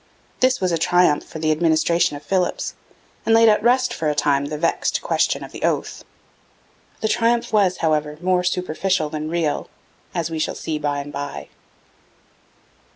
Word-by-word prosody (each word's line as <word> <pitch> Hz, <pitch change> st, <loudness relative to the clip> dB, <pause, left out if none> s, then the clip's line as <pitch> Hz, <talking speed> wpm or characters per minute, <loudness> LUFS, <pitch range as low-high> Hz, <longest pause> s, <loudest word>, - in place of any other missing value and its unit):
This 255 Hz, 0 st, +3 dB
was 185 Hz, -2 st, 0 dB
a 165 Hz, -, 0 dB
triumph 175 Hz, -2 st, +3 dB
for -, -, -10 dB
the 155 Hz, 0 st, +1 dB
administration 160 Hz, 0 st, +2 dB
of 145 Hz, -, -14 dB
Philipps, 185 Hz, -2 st, -1 dB, 0.5 s
and 225 Hz, -, +3 dB
laid 230 Hz, 0 st, +6 dB
at 210 Hz, -1 st, +4 dB
rest 245 Hz, +1 st, +2 dB
for 155 Hz, -, -1 dB
a 150 Hz, -, -1 dB
time 140 Hz, -1 st, +1 dB
the 150 Hz, +1 st, -4 dB
vexed 165 Hz, +2 st, 0 dB
question -, -, 0 dB
of -, -, -10 dB
the -, -, -9 dB
oath. -, -, -1 dB, 1.0 s
The 220 Hz, -, +1 dB
triumph 235 Hz, +1 st, +1 dB
was, 195 Hz, -4 st, +3 dB
however, 150 Hz, -1 st, 0 dB
more 180 Hz, +1 st, +1 dB
superficial 180 Hz, -2 st, -1 dB
than 155 Hz, 0 st, -4 dB
real, 165 Hz, -3 st, -1 dB, 0.5 s
as 170 Hz, -2 st, -2 dB
we 160 Hz, -, -3 dB
shall -, -, -1 dB
see 155 Hz, -2 st, -4 dB
by 145 Hz, -1 st, -1 dB
and 145 Hz, +1 st, -10 dB
by. 145 Hz, 0 st, -6 dB
165 Hz, 170 wpm, -21 LUFS, 150-190 Hz, 1.0 s, laid